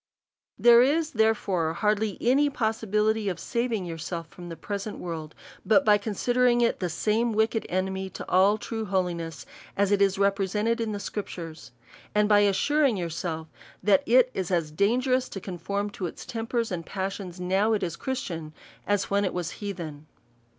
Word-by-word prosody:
There 240 0 +7
is, 305 +5 +2
therefore, 200 -7 +1
hardly 210 +1 0
any 275 +4 +3
possibility 220 -3 0
of 180 - -4
saving 235 -5 -1
yourself 165 0 -5
from 175 -1 -10
the 165 - -6
present 205 +3 -5
world, 160 -3 -6 0.3
but 250 +6 +4
by 210 -1 +5
considering 240 +3 +2
it 235 - +2
as - - -34
the 180 - -1
same 220 +7 0
wicked 220 +1 +1
enemy 190 +1 -2
to 190 - -8
all 195 +3 +4
true 225 0 -4
holiness, 175 -5 -2 0.3
as 200 0 +2
it 200 -1 +3
is 195 -1 +3
represented 200 +3 +1
in 225 -1 -1
the 205 - -3
scriptures; 170 - -6 0.4
and 210 0 +4
by 210 -1 +5
assuring 230 +6 +3
your 170 -2 -3
self, 160 -1 -4 0.4
that 200 -2 +5
it 255 +2 +5
is 185 -2 -3
as 170 -4 0
dangerous 250 - +1
to 195 - -6
conform 200 +3 -4
to 185 -3 -4
its - - -9
tempers 230 -1 -2
and 170 -2 -4
passions, 190 -2 -4
now 190 +5 +2
it 215 - 0
is 170 -2 -2
Christian, 170 -10 -4 0.3
as 205 -1 0
when 200 0 +2
it 185 - -2
was 175 -2 -2
hea 205 -2 -5
then. 155 -5 -8
200 Hz, 175 wpm, -27 LUFS, 180-225 Hz, 0.4 s, There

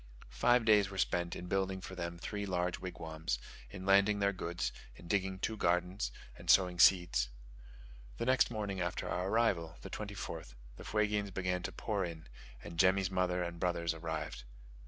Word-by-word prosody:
Five 120 - +3
days 105 -3 +5
were 95 - -8
spent 85 -2 0
in 90 - -6
building 95 0 0
for 95 - -8
them 85 -2 -4
three 100 +4 -4
large 90 -1 -1
wigwams, 80 -6 -4 0.3
in 95 -2 -8
landing 100 +2 +5
their 100 0 +2
goods, 85 -1 -2 0.2
in 85 - -13
digging 95 0 0
two 110 +4 -2
gardens, 90 - 0 0.2
and - - -11
sowing 90 -2 +5
seeds. 85 -11 +5 0.9
The - - -2
next 130 -1 +4
morning 105 -4 -3
after 90 0 -2
our 90 +1 -1
arrival 95 -7 +1
(the - - -8
24th) 100 - -6 0.2
the - - -9
Fuegians 105 -1 0
began 90 -1 -1
to - - -4
pour 105 -3 -2
in, 85 -2 -6 0.4
and 85 - -8
Jemmy's 95 0 +4
mother 90 -1 +1
and 85 -1 -5
brothers 85 -2 0
arrived. 80 -4 -4
90 Hz, 170 wpm, -34 LUFS, 85-100 Hz, 0.9 s, days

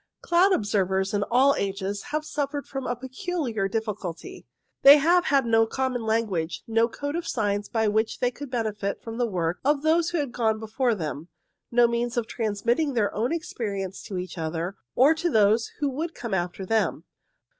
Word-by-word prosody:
Cloud 350 +3 +4
observers, 195 - +1
in 205 - +1
all 265 +4 +5
ages, 195 0 -3
have 305 0 -2
suffered 290 -1 -3
from 270 -1 -5
a 245 - -1
peculiar 260 - -3
difficulty. 215 - -5 0.3
They 280 +2 +10
have 345 +4 +3
had 275 -2 +3
no 225 -1 +3
common 260 0 -1
language, 205 -7 -1
no 230 0 +2
code 285 +5 -5
of 340 0 -3
signs 205 -3 -1
by 225 -2 +1
which 220 +1 0
they 245 -1 +1
could 285 +2 -8
benefit 215 -5 -3
from 225 +1 -6
the 240 - +2
work 175 -4 -2
of 290 +1 +2
those 325 +2 +3
who 350 - -2
had 285 -5 -1
gone 220 -3 +1
before 225 +2 0
them, 155 -3 -5 0.4
no 240 0 +5
means 235 +1 -2
of 235 - +1
transmitting 235 +7 -1
their 210 -3 +1
own 230 +5 -1
experience 200 - -4
to 190 - -5
each 180 -1 -6
other, 165 +4 -3 0.2
or 275 +5 +6
to 335 +2 -1
those 220 -2 +3
who 290 - +2
would 320 +5 -4
come 235 -4 -5
after 180 +1 -2
them. 225 +3 0
230 Hz, 185 wpm, -26 LUFS, 200-275 Hz, 0.4 s, They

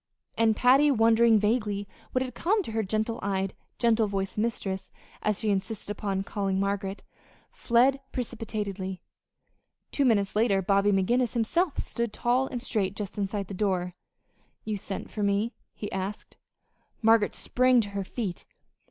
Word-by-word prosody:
And 225 -1 +3
Patty, 265 +6 +5
wondering 230 -2 +5
vaguely 210 -2 0 0.2
what 255 - +1
had 255 -2 -6
come 400 - +1
to 225 - -6
her 220 0 0
gentle 220 +3 -1
eyed, 195 -1 -1 0.2
gentle 230 -2 +3
voiced 195 -1 -3
mistress 200 -4 -2 0.3
as 210 -2 0
she 215 -1 0
insisted 200 +1 -3
upon 195 -2 -2
calling 195 -2 -1
Margaret 200 0 -2 0.5
fled 255 +3 +3
precipitately. 210 -6 -4 0.9
Two 285 - +1
minutes 210 -7 +2
later 210 -3 +3
Bobby 200 +2 +3
McGinnis 235 +5 +2
himself 290 - +1
stood 235 -2 -2
tall 250 +2 +1
and 245 -3 -5
straight 200 -6 -1
just 205 0 -5
inside 200 0 -2
the 195 - -7
door. 180 -2 -1 0.7
"You 215 -1 -1
sent 195 0 -6
for 215 - -4
me?" 205 +3 +1 0.2
he 205 0 -7
asked. 195 +1 -5 0.7
Margaret 225 -1 +4
sprang 255 0 +3
to 205 - -5
her 200 -1 -3
feet. 190 -2 -5
210 Hz, 150 wpm, -28 LUFS, 195-235 Hz, 0.9 s, Patty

